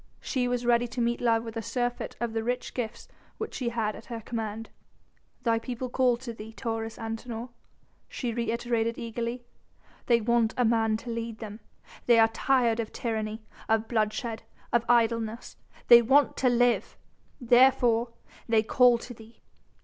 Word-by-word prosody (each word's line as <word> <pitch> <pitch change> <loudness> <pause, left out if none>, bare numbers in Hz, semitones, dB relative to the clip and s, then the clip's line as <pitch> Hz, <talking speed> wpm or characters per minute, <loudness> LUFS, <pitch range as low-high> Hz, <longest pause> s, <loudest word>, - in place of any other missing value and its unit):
She 250 -3 -1
was 245 0 -1
ready 240 0 +3
to 230 +1 -7
meet 235 0 0
love 230 -2 +2
with 225 -1 -8
a 225 - -2
surfeit 245 +1 -3
of 235 -2 -2
the 225 -1 -1
rich 245 +2 -3
gifts 230 -3 -5 0.3
which - - -5
she 250 -4 -2
had 225 -3 -2
at - - -12
her 235 -2 -5
command. 225 -1 -5 0.7
"The 230 -1 +2
people 250 +2 -5
call 250 -2 +3
to 240 -1 -7
thee, 220 0 -10
Taurus 225 0 -4
Antinor," 225 +1 -5 0.6
she 240 -3 -3
reiterated 235 0 -1
eagerly; 235 +1 -4 0.6
"they 235 -1 +4
want 230 0 +1
a 250 - +3
man 225 -1 +2
to 240 - -4
lead 230 -1 -4
them. 215 -1 -8 0.5
They 240 -1 +6
are 225 0 +6
tired 235 0 +1
of 225 -2 -3
tyranny, 220 -1 -3 0.3
of 220 0 +2
bloodshed 220 0 -1 0.3
and 235 - +4
of 235 - -19
idleness. 230 -1 +1 0.3
They 235 0 +9
want 270 +5 +3
to 255 - +3
live! 245 0 +1 0.4
Therefore 240 -1 +4 0.4
they 220 -1 +4
call 245 +1 +5
to 245 +1 -9
thee. 225 0 -17
235 Hz, 165 wpm, -28 LUFS, 225-245 Hz, 0.7 s, They